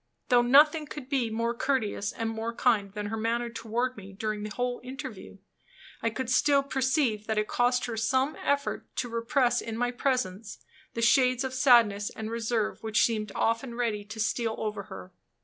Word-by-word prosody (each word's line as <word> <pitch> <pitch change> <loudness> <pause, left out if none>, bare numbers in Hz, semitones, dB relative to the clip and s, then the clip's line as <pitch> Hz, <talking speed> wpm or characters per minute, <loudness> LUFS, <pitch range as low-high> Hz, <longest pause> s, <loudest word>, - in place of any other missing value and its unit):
Though 245 -2 +6
nothing 295 +5 +5
could 280 -3 -8
be 260 -5 0
more 230 +1 -1
courteous 235 -5 -1
and 225 - -3
more 225 +1 -4
kind 210 -6 +2
than 210 0 -4
her 220 +2 -3
manner 235 +2 -1
toward 240 +3 -2
me 195 -1 -10
during 215 +1 -3
the 210 - -4
whole 245 +2 -3
interview, 260 +2 -8 0.6
I 230 - +1
could 255 +3 -4
still 280 +2 +4
perceive 260 -5 0
that 220 -1 -1
it 215 0 +1
cost 245 +1 +1
her 235 - -4
some 260 +6 +1
effort 285 0 -1
to 245 - -2
repress 240 +1 +1
in 225 -1 -5
my 245 +1 0
presence 235 -6 -2 0.4
the 230 - -1
shades 255 +1 +4
of 260 -1 -3
sadness 235 -6 +4
and 220 0 -6
reserve 230 -1 -1
which 220 -1 +2
seemed 215 -3 -2
often 230 +2 0
ready 225 -4 -1
to 215 +2 -9
steal 220 +1 0
over 210 -2 -4
her. 185 - -10
235 Hz, 185 wpm, -28 LUFS, 220-255 Hz, 0.6 s, Though